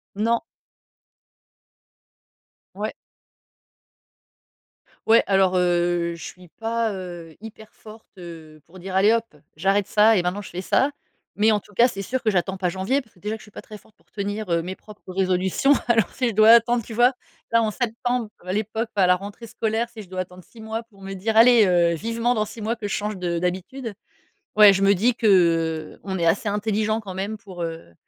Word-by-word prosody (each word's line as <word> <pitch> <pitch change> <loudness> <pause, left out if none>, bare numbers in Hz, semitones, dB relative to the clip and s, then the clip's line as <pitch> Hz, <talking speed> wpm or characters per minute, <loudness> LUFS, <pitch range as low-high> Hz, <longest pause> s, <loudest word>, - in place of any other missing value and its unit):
Non. 230 +3 +1 2.4
Ouais. - - -4 2.1
Ouais, 230 +1 +6
alors, 190 -2 +3
heu, 175 -1 +1
je 165 - -11
suis 180 -1 -11
pas, 225 +5 -2
heu, 175 -4 -8
hyper 220 -1 -11
forte, 220 0 -14
heu, 160 -4 -11
pour 185 +2 -16
dire: 185 +1 -7
«Allez 205 +3 +5
hop, 230 -9 -2 0.2
j'arrête 195 +4 +1
ça 215 +1 +4
et 180 - +2
maintenant 180 +3 -2
je 200 - -9
fais 180 +2 -6
ça», 275 +9 +2 0.4
mais 215 +1 +4
en 210 - +1
tout 205 - -21
cas, 240 +4 +5
c'est 195 - -6
sûr 255 +6 -3
que 220 - +2
j'attends 190 0 -1
pas 180 -2 -1
janvier 205 +10 -1
parce 220 - -28
que - - -23
déjà 215 +2 -3
je - - -15
suis 210 - -16
pas - - -9
très 215 - -11
forte 210 - -21
pour - - -34
tenir, 205 0 -4
heu, 170 -1 +1
mes 185 +2 -5
propres 210 -3 -13
résolutions. 190 +8 +2
Alors 225 -5 +3
si 250 -3 0
je - - -5
dois 215 +1 +5
attendre. 235 0 +4
Tu 225 - -9
vois, 245 +3 +4 0.4
là 230 - +5
en 215 - 0
septembre, 245 0 -2 0.2
à 185 - -2
l'époque, 220 +2 -2
à 190 -2 +4
la 180 - +5
rentrée 205 +4 -9
scolaire, 225 +2 -2
si 225 - -11
je 195 - -11
dois 185 0 -4
attendre 180 0 -8
6 225 +4 -15
mois 220 +1 -4
pour 200 -4 -21
me 195 0 -7
dire: 220 +4 -2
«Allez, 230 -2 +7
heu, 175 -2 +3
vivement 230 +6 -1
dans 215 -1 0
6 220 0 -10
mois 225 +2 -1
que 215 -3 -6
je - - -2
change 210 -1 -3
de 170 -1 -2
d'habitude», 190 +7 -4 0.6
ouais 210 -2 +8
je 195 - -1
me 200 +1 +5
dis 230 +6 +2
que, 230 -2 -2 0.7
heu, - - -27
on 190 -2 -3
est 170 - 0
assez 200 +5 +1
intelligent 215 +1 -1
quand 195 -3 -8
même 200 +3 -4
pour, 185 -5 -9
heu, 165 - -6
205 Hz, 205 wpm, -23 LUFS, 185-225 Hz, 2.4 s, ouais